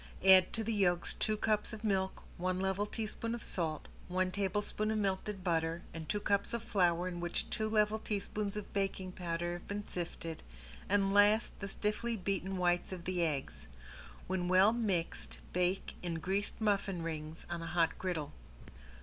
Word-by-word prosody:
Add 190 Hz, -1 st, +8 dB
to 225 Hz, -, 0 dB
the 225 Hz, +1 st, -1 dB
yolks 175 Hz, -4 st, +2 dB
two 215 Hz, 0 st, 0 dB
cups 215 Hz, +1 st, +1 dB
of 220 Hz, 0 st, -7 dB
milk, 190 Hz, -3 st, 0 dB
one 185 Hz, +1 st, 0 dB
level 190 Hz, +2 st, 0 dB
teaspoon 225 Hz, +2 st, -3 dB
of 235 Hz, -, -5 dB
salt, 160 Hz, -4 st, -2 dB, 0.2 s
one 185 Hz, +1 st, +1 dB
tablespoon 205 Hz, +2 st, -1 dB
of 220 Hz, -, +1 dB
melted 195 Hz, -1 st, -1 dB
butter 165 Hz, -1 st, 0 dB
and 160 Hz, -1 st, -7 dB
two 210 Hz, -, +1 dB
cups 200 Hz, +2 st, +1 dB
of 235 Hz, -, -3 dB
flour 180 Hz, -5 st, +2 dB
in 175 Hz, -1 st, -4 dB
which 175 Hz, 0 st, -2 dB
two 215 Hz, 0 st, 0 dB
level 215 Hz, 0 st, +3 dB
teaspoons 210 Hz, -1 st, -2 dB
of 210 Hz, -, -6 dB
baking 195 Hz, -2 st, -1 dB
powder 175 Hz, -1 st, -2 dB
have 175 Hz, -, -8 dB
been 205 Hz, +1 st, -4 dB
sifted, 165 Hz, -2 st, -5 dB, 0.5 s
and 195 Hz, 0 st, +3 dB
last 205 Hz, +2 st, +5 dB
the 200 Hz, -, -4 dB
stiffly 215 Hz, +3 st, -1 dB
beaten 190 Hz, 0 st, -2 dB
whites 175 Hz, 0 st, +1 dB
of 180 Hz, -2 st, -6 dB
the 180 Hz, -1 st, 0 dB
eggs. 145 Hz, -4 st, -2 dB, 0.6 s
When 185 Hz, -1 st, -1 dB
well 185 Hz, +4 st, +6 dB
mixed 200 Hz, -8 st, -1 dB, 0.2 s
bake 180 Hz, +2 st, 0 dB
in 175 Hz, -2 st, -2 dB
greased 190 Hz, +5 st, -1 dB
muffin 200 Hz, -5 st, +1 dB
rings 155 Hz, 0 st, -5 dB
on 170 Hz, -1 st, -4 dB
a 165 Hz, -, -5 dB
hot 170 Hz, -1 st, +1 dB
griddle. 170 Hz, -6 st, -2 dB
190 Hz, 175 wpm, -34 LUFS, 175-210 Hz, 0.6 s, Add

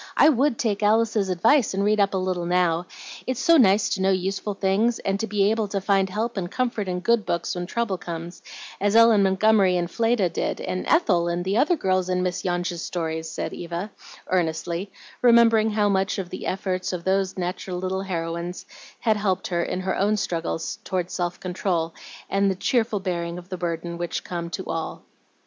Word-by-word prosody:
I 300 Hz, -, +7 dB
WOULD 275 Hz, -2 st, +2 dB
take 215 Hz, -6 st, -1 dB
Alice's 215 Hz, -1 st, +2 dB
advice 220 Hz, +6 st, +3 dB
and 200 Hz, -, 0 dB
read 210 Hz, 0 st, +2 dB
up 200 Hz, -1 st, +2 dB
a -, -, +2 dB
little 185 Hz, -2 st, -2 dB
now; 175 Hz, -1 st, +1 dB, 0.4 s
it's 255 Hz, -1 st, -1 dB
so 335 Hz, 0 st, +5 dB
nice 205 Hz, -5 st, +5 dB
to 190 Hz, -, -1 dB
know 190 Hz, -, +3 dB
useful 195 Hz, +2 st, -1 dB
things, 205 Hz, +5 st, +1 dB
and 200 Hz, +3 st, -2 dB
be 205 Hz, 0 st, +2 dB
able 220 Hz, -1 st, 0 dB
to 195 Hz, 0 st, -2 dB
find 195 Hz, 0 st, +2 dB
help 220 Hz, +4 st, -3 dB
and 175 Hz, -2 st, -2 dB
comfort 235 Hz, -3 st, -2 dB
in 180 Hz, 0 st, -2 dB
good 235 Hz, +2 st, +2 dB
books 170 Hz, -3 st, -2 dB
when 175 Hz, -1 st, -4 dB
trouble 215 Hz, -3 st, -2 dB
comes, 170 Hz, 0 st, -7 dB, 0.4 s
as 205 Hz, +2 st, +1 dB
Ellen 230 Hz, -2 st, +7 dB
Montgomery 195 Hz, -1 st, +3 dB
and 175 Hz, 0 st, -2 dB
Fleda 230 Hz, -4 st, +2 dB
did, -, -, -2 dB
and 185 Hz, -, -3 dB
Ethel, 185 Hz, -, +3 dB
and 175 Hz, +1 st, -2 dB
the 195 Hz, +2 st, 0 dB
other 300 Hz, +9 st, +3 dB
girls 185 Hz, -, 0 dB
in 180 Hz, 0 st, +1 dB
Miss 180 Hz, 0 st, -2 dB
Yonge's 175 Hz, -1 st, -2 dB
stories," 160 Hz, -2 st, -3 dB
said -, -, -4 dB
Eva, 175 Hz, +4 st, -5 dB, 0.4 s
earnestly, 175 Hz, +2 st, -1 dB, 0.3 s
remembering 230 Hz, -2 st, +5 dB
how 210 Hz, -1 st, +1 dB
much 190 Hz, -1 st, +1 dB
the 185 Hz, -1 st, -5 dB
efforts 185 Hz, -1 st, -2 dB
of 175 Hz, -2 st, -4 dB
those 190 Hz, 0 st, 0 dB
natural 180 Hz, 0 st, -3 dB
little 185 Hz, +1 st, -2 dB
heroines 170 Hz, -1 st, -4 dB, 0.4 s
had 220 Hz, -2 st, +2 dB
helped 190 Hz, -3 st, -1 dB
her 175 Hz, -2 st, 0 dB
in 180 Hz, -, -2 dB
her 190 Hz, 0 st, -1 dB
own 210 Hz, +2 st, +1 dB
struggles 165 Hz, -4 st, -3 dB
tor 185 Hz, -1 st, -1 dB
self 175 Hz, -1 st, -3 dB
control 175 Hz, -3 st, -2 dB, 0.3 s
and 195 Hz, 0 st, +2 dB
the 190 Hz, -, 0 dB
cheerful 225 Hz, 0 st, 0 dB
bearing 170 Hz, -2 st, -3 dB
of 180 Hz, +1 st, -11 dB
the 185 Hz, -, -3 dB
burdens 170 Hz, -1 st, -4 dB
which 175 Hz, 0 st, -3 dB
come 170 Hz, -1 st, -5 dB
to 180 Hz, +3 st, -4 dB
all. 165 Hz, -1 st, -4 dB
190 Hz, 195 wpm, -24 LUFS, 175-210 Hz, 0.4 s, I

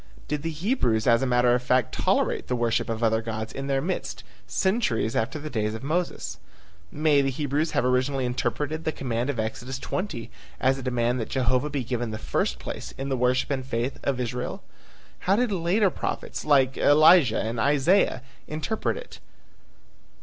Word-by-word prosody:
Did 150 Hz, -1 st, -2 dB
the 165 Hz, -, -2 dB
Hebrews 155 Hz, -, 0 dB
as 115 Hz, -1 st, +4 dB
a 135 Hz, -, +1 dB
matter 125 Hz, 0 st, +4 dB
of 125 Hz, -, +2 dB
fact 125 Hz, -1 st, +2 dB
tolerate -, -, +1 dB
the 125 Hz, -, 0 dB
worship 120 Hz, -1 st, 0 dB
of 115 Hz, 0 st, -2 dB
other 110 Hz, 0 st, +3 dB
gods 110 Hz, -1 st, -5 dB
in 135 Hz, 0 st, -5 dB
their 135 Hz, -1 st, 0 dB
midst 180 Hz, +2 st, -3 dB, 0.2 s
centuries 160 Hz, -, 0 dB
after 125 Hz, +7 st, 0 dB
the 155 Hz, 0 st, -6 dB
days 110 Hz, -5 st, -1 dB
of 110 Hz, -, -8 dB
Moses? 170 Hz, +5 st, -2 dB, 0.5 s
May 150 Hz, -1 st, +3 dB
the 135 Hz, -, +1 dB
Hebrews 145 Hz, +3 st, -1 dB
have -, -, +1 dB
originally 130 Hz, +1 st, +1 dB
interpreted 130 Hz, +6 st, -2 dB
the 160 Hz, -, 0 dB
command 125 Hz, -2 st, -2 dB
of 135 Hz, -5 st, -2 dB
Exodus 125 Hz, +4 st, -3 dB
20 135 Hz, -, -4 dB, 0.3 s
as 135 Hz, +1 st, +2 dB
a -, -, -6 dB
demand 125 Hz, -1 st, 0 dB
that 115 Hz, -, -4 dB
Jehovah 130 Hz, +2 st, +1 dB
be 140 Hz, -3 st, -2 dB
given 120 Hz, -1 st, -2 dB
the 110 Hz, -, -4 dB
first -, -, -1 dB
place -, -, -7 dB
in 135 Hz, +1 st, -4 dB
the 135 Hz, -, +1 dB
worship 125 Hz, +2 st, +1 dB
and 135 Hz, -2 st, -1 dB
faith 125 Hz, +1 st, -3 dB
of 135 Hz, -2 st, -1 dB
Israel? 125 Hz, 0 st, -3 dB, 0.6 s
How 190 Hz, -, +2 dB
did 240 Hz, 0 st, +1 dB
later 190 Hz, +2 st, +2 dB
prophets -, -, -4 dB
like 135 Hz, -3 st, +3 dB
Elijah 150 Hz, -4 st, +6 dB
and 115 Hz, +1 st, -2 dB
Isaiah 145 Hz, -, +3 dB, 0.2 s
interpret 155 Hz, +8 st, -2 dB
it? -, -, -10 dB
130 Hz, 180 wpm, -26 LUFS, 120-150 Hz, 0.6 s, Elijah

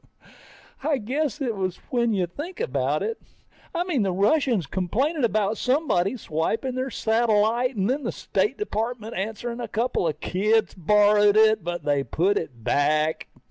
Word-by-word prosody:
I 290 Hz, +1 st, +1 dB
guess 280 Hz, +6 st, -2 dB
it 240 Hz, -5 st, -1 dB
is 185 Hz, -2 st, -2 dB
when 235 Hz, -2 st, +2 dB
you 190 Hz, -4 st, +1 dB
think 295 Hz, -, -8 dB
about 135 Hz, +3 st, 0 dB
it. 450 Hz, -, -3 dB, 0.5 s
I 345 Hz, -, +1 dB
mean, 340 Hz, -9 st, 0 dB
the 195 Hz, -2 st, +1 dB
Russians 210 Hz, -, +2 dB
complaining 245 Hz, -, -1 dB
about 215 Hz, -2 st, +1 dB
somebody 255 Hz, -, +1 dB
swiping 225 Hz, +9 st, -2 dB
their 255 Hz, +1 st, -2 dB
satellite 230 Hz, +2 st, +1 dB
and 195 Hz, -1 st, 0 dB
then 270 Hz, +5 st, 0 dB
the -, -, -2 dB
State -, -, -1 dB
Department 230 Hz, -, -3 dB
answering 225 Hz, +4 st, -4 dB
a 240 Hz, -, -4 dB
couple 225 Hz, -4 st, 0 dB
of 155 Hz, -, -3 dB
kids 215 Hz, +4 st, +1 dB
borrowed 205 Hz, +3 st, +4 dB
it, 220 Hz, -2 st, +5 dB
but 175 Hz, -1 st, -4 dB
they 145 Hz, -2 st, +1 dB
put 190 Hz, +8 st, +1 dB
it 125 Hz, -8 st, -9 dB
back. 155 Hz, +4 st, +1 dB
215 Hz, 160 wpm, -24 LUFS, 185-250 Hz, 0.5 s, it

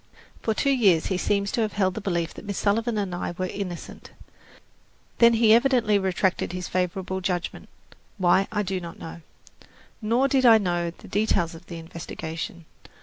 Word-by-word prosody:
For 220 Hz, -, 0 dB
two 275 Hz, +5 st, +2 dB
years 200 Hz, -11 st, +4 dB
he -, -, 0 dB
seems 200 Hz, 0 st, 0 dB
to 235 Hz, -, 0 dB
have 215 Hz, -2 st, -1 dB
held 190 Hz, -3 st, +1 dB
the 220 Hz, -, -5 dB
belief 170 Hz, -4 st, -1 dB
that -, -, -10 dB
Miss 200 Hz, -2 st, -4 dB
Sullivan 225 Hz, +2 st, +1 dB
and 200 Hz, -3 st, -2 dB
I 175 Hz, 0 st, -4 dB
were 185 Hz, -, -1 dB
innocent. 185 Hz, -2 st, -6 dB, 1.1 s
Then 235 Hz, 0 st, +7 dB
he 225 Hz, -1 st, +5 dB
evidently 235 Hz, -4 st, +4 dB
retracted 190 Hz, -1 st, 0 dB
his 180 Hz, 0 st, -4 dB
favourable 185 Hz, +1 st, -2 dB
judgment, 180 Hz, -2 st, -3 dB, 0.5 s
why 190 Hz, +1 st, +3 dB
I 210 Hz, -1 st, 0 dB
do 190 Hz, -1 st, -2 dB
not 170 Hz, -1 st, -8 dB
know. 165 Hz, +1 st, -9 dB, 0.8 s
Nor 235 Hz, +5 st, +2 dB
did 270 Hz, -1 st, +2 dB
I 230 Hz, -3 st, +8 dB
know 175 Hz, -4 st, -1 dB
the 170 Hz, -, -14 dB
details 200 Hz, -5 st, +1 dB
of 165 Hz, +2 st, -13 dB
the 170 Hz, -, -7 dB
investigation. 165 Hz, 0 st, -7 dB
190 Hz, 175 wpm, -25 LUFS, 175-220 Hz, 1.1 s, I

